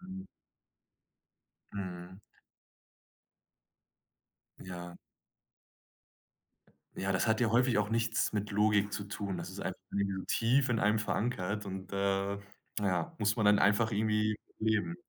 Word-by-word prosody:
Hm. 190 +1 -8 1.5
Mhm. 90 -1 -6 2.4
Ja. 90 -1 -8 2.0
Ja, 100 +1 -1
das 95 +4 +1
hat 110 0 +3
ja 115 -3 +2
häufig 120 0 +3
auch 105 0 +1
nichts 115 0 +1
mit 105 -1 -1
Logik 105 0 +3
zu 100 - -3
tun. 100 -2 -4
Das 85 - -5
ist - - -8
einfach - - -4
irgendwie 100 -1 -1
tief 125 +4 +3
in 120 -2 +2
einem 105 +1 +3
verankert 105 -2 -1
und, 95 -1 -6
äh, 100 0 0 0.4
na 105 - 0
ja, 90 -3 -1
muss 105 -1 +2
man 110 - +1
dann 105 0 +6
einfach 105 +3 +3
irgendwie 105 0 +1 0.2
leben. 110 +9 +1
105 Hz, 125 wpm, -32 LUFS, 100-110 Hz, 2.4 s, dann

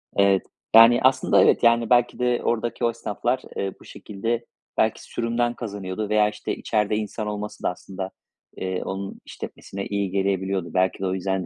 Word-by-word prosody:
evet, 100 -1 +4 0.3
yani, 115 +1 +9
aslında, 130 +1 +4
evet, - - +4
yani, 115 -1 +4
belki 120 0 +3
de 125 -1 +1
oradaki 120 0 -1
o - - +4
esnaflar, 115 +2 -2 0.2
eee, 95 -1 -2
bu - - -15
şekilde 115 +3 -4 0.3
belki - - +1
sürümden 120 +1 -1
kazanıyordu 105 -3 -5
veya, 105 0 +4
işte, - - -4
içeride 105 -1 0
insan 105 0 -3
olması 105 0 -5
da - - +2
aslında, 95 +1 -6 0.5
eee, 95 -1 -3
onun 95 0 -5
işletmesine 100 0 -7
iyi 100 -2 -1
gelebiliyordu. 95 -2 -1
Belki 95 0 +1
de 95 - -2
o 95 - 0
yüzden 95 0 -1
105 Hz, 170 wpm, -24 LUFS, 95-115 Hz, 0.5 s, yani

